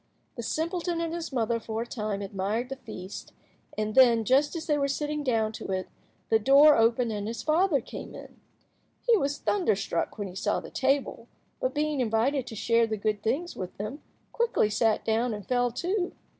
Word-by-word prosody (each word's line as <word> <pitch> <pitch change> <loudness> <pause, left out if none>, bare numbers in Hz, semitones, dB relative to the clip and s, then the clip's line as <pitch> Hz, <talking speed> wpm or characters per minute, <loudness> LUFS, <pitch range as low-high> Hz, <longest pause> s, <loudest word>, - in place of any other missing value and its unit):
The 235 - -5
simpleton 335 +6 -2
and 335 -1 -2
his 335 -2 -4
mother 235 -2 0
for 225 0 -3
a - - -10
time 210 -4 -3
admired 200 +5 -2
the 270 - -4
feast, 195 -7 -9 0.4
and 215 0 -1
then, 235 -3 +6
just 280 - +3
as 325 -1 -4
they 300 - +2
were 280 -1 +1
sitting 295 +2 -2
down 225 -5 +1
to 220 - -8
it, 190 -1 -2 0.4
the 220 - +4
door 280 +6 +7
opened 230 +1 +3
and 205 -1 -3
his 230 0 -5
father 315 0 +3
came - - -9
in. - - -12 0.7
He 475 -2 +5
was 285 -7 0
thunderstruck 410 - 0
when 205 -2 -3
he 180 - -9
saw 200 +2 0
the - - -10
table, 275 +1 0 0.3
but, - - -1
being 300 -1 0
invited 250 +3 +1
to 225 - -7
share 230 +2 +2
the 220 -1 -2
good 210 0 -1
things 275 +11 -1
with 185 -2 -6
them, 215 +9 -5 0.3
quickly 465 - +1
sat 220 0 +1
down 225 +1 +1
and 205 -2 -9
fell 245 -1 +2
to. 355 - -2
245 Hz, 195 wpm, -28 LUFS, 220-300 Hz, 0.7 s, door